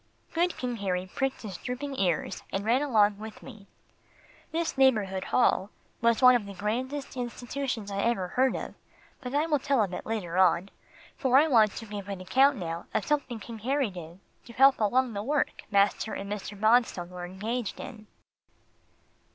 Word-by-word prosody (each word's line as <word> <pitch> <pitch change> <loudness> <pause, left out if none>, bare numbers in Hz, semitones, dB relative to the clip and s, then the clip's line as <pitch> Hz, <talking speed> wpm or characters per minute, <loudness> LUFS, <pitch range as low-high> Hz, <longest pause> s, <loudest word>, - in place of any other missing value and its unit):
Good 345 +2 +1
King 245 -2 -3
Harry 185 -3 -2
pricked 270 -2 -2
his 195 -5 -6
drooping 270 +3 -5
ears, 175 -5 0
and 195 +1 -2
ran 240 +5 +3
along 210 -7 +3
with 220 0 -9
me. 215 -6 -12 0.8
This 330 +1 -1
Neighbourhood 215 -8 +2
Hall 205 -5 +2 0.3
was 235 +1 +2
one 250 0 +9
of 235 -5 0
the 200 - -8
grandest 255 +9 -3
institutions 245 -2 -4
I 200 0 -1
ever 195 -6 0
heard 260 +4 +2
of, - - -5 0.5
but 255 +1 -5
I 295 +2 +3
will 305 -3 +1
tell 270 -4 +2
of 190 -3 -4
it - - -6
later 185 -6 -2
on, 185 +1 +3 0.5
for 260 -1 +3
I 300 +3 +5
want 220 -7 +4
to 225 - -7
give 205 -2 -7
an 195 -2 -4
account 265 +9 +3
now 170 -2 -5
of - - +1
something 285 -6 -1
King 225 +2 -9
Harry 260 0 0
did 175 -1 -10 0.3
to 235 - -12
help 270 +2 +5
along 245 +3 +2
the 200 - -3
work 290 +7 -1
master 200 +2 +2
and 200 +1 -6
Mr. 205 0 -5
Bonstone 215 -5 +2
were 180 -1 -8
engaged 210 +5 -4
in. 215 -3 -9
225 Hz, 180 wpm, -28 LUFS, 200-260 Hz, 0.8 s, one